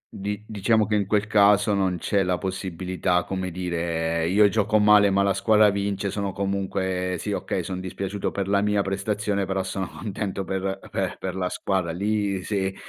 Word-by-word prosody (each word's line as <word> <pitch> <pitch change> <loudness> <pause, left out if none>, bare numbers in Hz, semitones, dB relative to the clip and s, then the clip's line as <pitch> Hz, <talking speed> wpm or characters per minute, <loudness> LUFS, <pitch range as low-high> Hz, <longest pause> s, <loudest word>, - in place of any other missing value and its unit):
Di 105 +1 -4
diciamo 110 +1 +2
che 105 - -3
in 100 -2 +1
quel 105 -1 +1
caso 105 -1 +4
non 95 -2 +1
c'è 100 +3 0
la 90 -1 +1
possibilità, 95 -1 -1
come 95 -1 -3
dire: 85 -2 -1
"Io 105 +2 +5
gioco 110 +1 +2
male 105 -1 +6
ma 100 +1 +2
la 100 - +2
squadra 105 +2 +4
vince"; 100 0 -2
sono 100 -2 -2
comunque 95 -2 -2
sì, - - -4
okay, - - -2
son 95 -1 -4
dispiaciuto 95 +2 -3
per 100 -1 -3
la 100 0 +2
mia 105 -1 +1
prestazione, 100 0 -1
però 95 0 -1
sono 95 -1 -3
contento 100 -2 -4
per 95 +1 -2
per - - -2
per - - -4
la 90 -1 -2
squadra; 95 -3 -1
lì 100 0 -1
se 95 -2 -2
95 Hz, 180 wpm, -24 LUFS, 95-105 Hz, -, male